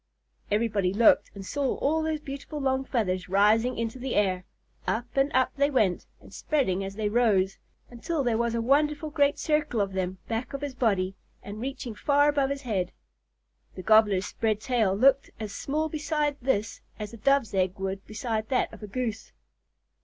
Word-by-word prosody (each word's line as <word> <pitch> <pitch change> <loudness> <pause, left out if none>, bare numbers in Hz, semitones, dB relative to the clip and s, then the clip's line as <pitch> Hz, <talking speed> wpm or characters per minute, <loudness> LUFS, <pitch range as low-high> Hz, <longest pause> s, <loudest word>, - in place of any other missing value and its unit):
Everybody 210 -3 +1
looked 230 +1 +5
and 195 -1 -8
saw 280 +4 -1
all 315 +3 +1
those 315 -1 -2
beautiful 285 +1 -6
long 265 -1 0
feathers 185 -8 -1
rising 215 +6 +3
into 230 +2 -3
the 255 0 -3
air. 185 -3 +1 0.4
Up 235 +2 0
and 275 +1 +2
up 260 0 +2
they 280 +1 +3
went, 215 -10 +1
and - - -16
spreading 195 - 0
as 195 0 -6
they 215 0 -1
rose, 205 -4 +2 0.3
until 280 +5 -2
there 235 -3 +1
was 235 0 0
a 230 - -1
wonderful 295 +4 +1
great 285 -1 +2
circle 300 -6 0
of 195 -1 0
them 185 0 -2
back 230 +4 -3
of 275 - -4
his 285 -2 -4
body 195 -7 +1 0.3
and 205 +2 -7
reaching 260 -2 -5
far 290 +6 +3
above 280 -2 +1
his 280 0 -4
head. 190 -7 -1 0.8
The 185 - -7
Gobbler's 210 -2 +4
spread 215 -1 -1
tail 220 -5 +1
looked 270 +5 +4
as 215 -2 -5
small 305 +7 -1
beside 300 -1 -1
this 225 -4 -1 0.2
as 210 0 -6
a - - -8
Dove's 275 -3 +2
egg 185 0 0
would 195 0 -4
beside 220 0 -3
that 255 - 0
of - - -12
a 210 - -7
Goose. 225 0 -4
230 Hz, 185 wpm, -27 LUFS, 205-275 Hz, 0.8 s, looked